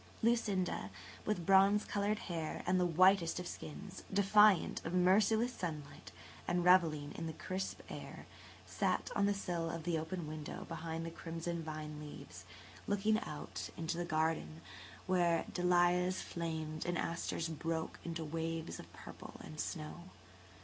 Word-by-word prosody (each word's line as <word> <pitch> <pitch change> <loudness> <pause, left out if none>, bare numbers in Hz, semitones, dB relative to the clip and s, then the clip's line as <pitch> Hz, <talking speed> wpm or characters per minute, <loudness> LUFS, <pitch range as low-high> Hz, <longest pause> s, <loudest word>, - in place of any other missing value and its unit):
Lucinda, 205 - +1 0.4
with 205 -6 -1
bronze 195 +2 +6
coloured 205 +1 0
hair 165 -4 -3
and 185 +1 +3
the 180 - +3
whitest 180 0 +5
of 180 - -5
skins, 185 +5 -7
defiant 200 -1 +5
of 165 +2 -2
merciless 215 +6 +4
sunlight 155 -8 -6 0.4
and 175 0 +1
revelling 160 -5 +5
in 165 - -4
the 160 - -4
crisp 185 +4 -4
air, - - -8 0.4
sat - - 0
on 200 -1 +3
the 205 - +3
sill 175 -4 -2
of 165 0 -4
the 165 -1 0
open 165 +2 -4
window 155 0 -6
behind 165 0 -4
the 165 - -4
crimson 165 +1 -4
vine 155 -1 -5
leaves, 150 -1 -9 0.4
looking 210 +2 +2
out - - -6
into 165 0 -2
the 175 - -1
garden, 155 - 0 0.4
where 175 -3 +3
dahlias 180 +1 +3
flamed 160 -2 -3
and 175 0 -1
asters 170 0 -1
broke 160 0 -3
into 165 -1 -4
waves 165 +1 -3
of - - -11
purple - - -10
and 155 - -9
snow. 170 +1 -4
170 Hz, 145 wpm, -36 LUFS, 160-185 Hz, 0.4 s, bronze